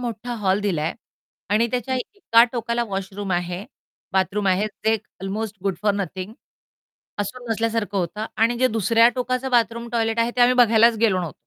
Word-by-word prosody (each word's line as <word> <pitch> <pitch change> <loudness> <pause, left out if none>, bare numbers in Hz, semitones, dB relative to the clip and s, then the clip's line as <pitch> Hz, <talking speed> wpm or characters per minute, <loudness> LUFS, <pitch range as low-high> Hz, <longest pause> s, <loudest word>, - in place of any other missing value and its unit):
मोठा 240 0 -4
हॉल 190 +1 +2
दिला 190 -7 -1
आहे 160 - -2 0.6
आणि 230 +2 +3
त्याच्या 250 +1 -2 0.2
एका 235 - +5
टोकाला 235 0 -1
वॉशरूम 195 -1 -4
आहे, 175 +2 -2 0.5
बाथरूम 195 +2 0
आहे 190 +3 +2 0.2
जे 220 - +5 0.3
अल्मोस्ट 205 +2 -4
गुड 195 -2 +1
फॉर 210 -1 +3
नथिंग. 190 0 -4 0.9
असून 240 +4 -5
नसल्यासारखं 225 -2 -1
होतं 190 +5 -3
आणि 230 +2 +2
जे 255 +1 +3
दुसऱ्या 225 +1 +4
टोकाचं 255 +1 -1
बाथरूम, 235 -1 +1
टॉयलेट 225 -1 0
आहे 230 +1 +2
ते - - +1
आम्ही 245 +1 +6
बघायलाच 230 -1 +5
गेलो 210 -4 +3
नव्ह 170 -5 -4
220 Hz, 170 wpm, -22 LUFS, 195-235 Hz, 0.9 s, आम्ही